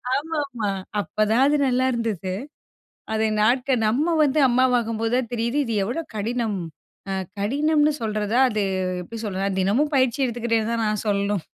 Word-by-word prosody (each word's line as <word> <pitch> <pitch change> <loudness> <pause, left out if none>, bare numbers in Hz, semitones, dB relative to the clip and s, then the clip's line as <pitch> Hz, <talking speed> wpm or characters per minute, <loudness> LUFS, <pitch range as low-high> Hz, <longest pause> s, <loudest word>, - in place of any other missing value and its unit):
ஆமாமா. 285 -7 -2 0.3
அப்பதான் 215 +5 +1
அது 295 +1 +3
நல்லாருந்துது. 235 -7 0 0.8
அத 220 - 0 0.2
நாட்கள் 250 +2 +2
நம்ம 305 +9 +1
வந்து 295 +1 +2
அம்மாவாகும்போது 240 -3 +1
தான் 250 -2 -2
தெரியிது. 235 +3 -1
இது 230 - -3
எவ்ளோ 240 +11 -2
கடினம்! 225 0 -1 0.5
அ - - 0 0.3
கடினம்னு 295 +8 +2
சொல்றதா 215 +1 -1
அது 215 -2 -1 0.4
எப்படி 230 +6 -8
சொல்றது. 195 -1 -2
தினமும் 265 +11 +1
பயிற்சி 260 +1 +2
எடுத்துக்கிட்டேன்னு 230 -2 -1
தான் 230 -1 0
நான் 210 0 -1
சொல்ணும் 200 -2 0
230 Hz, 135 wpm, -23 LUFS, 215-260 Hz, 0.8 s, அது